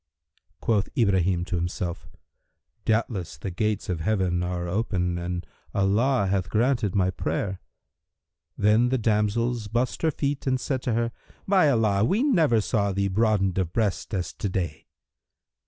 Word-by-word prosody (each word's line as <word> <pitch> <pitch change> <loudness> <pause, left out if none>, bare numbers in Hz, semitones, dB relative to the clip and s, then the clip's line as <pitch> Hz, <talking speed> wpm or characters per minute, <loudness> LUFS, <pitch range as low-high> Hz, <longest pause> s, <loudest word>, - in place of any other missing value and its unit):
Quoth 105 -4 +1
Ibrahim 95 -6 +2
to 90 - -2
himself, 85 0 -3 0.8
"Doubtless 110 - -1
the 95 +6 -5
gates 105 +3 -1
of 90 -3 -2
Heaven 90 -1 0
are 90 0 -2
open[FN#324] 90 -2 -1
and 90 0 -4 0.3
Allah 105 +5 +2
hath 95 -1 0
granted 115 -3 +1
my 95 -2 +2
prayer." 95 +1 -3 1.0
Then 110 +4 +4
the 130 - +1
damsels 110 +1 0
bussed 120 +4 -1
her 160 - +3
feet 140 -2 -2
and 130 0 +2
said 130 +2 -2
to 125 - -1
her, 115 +1 0 0.4
"By 185 -6 +5
Allah, 110 -6 +2
we 200 - +2
never 160 - +3
saw 100 -2 0
thee 100 +1 0
broadened 100 -2 +2
of 90 -3 -1
breast 105 -1 -1
as 90 -3 -3
to 100 - -3
day!" 85 -5 -3
105 Hz, 150 wpm, -26 LUFS, 90-115 Hz, 1.0 s, By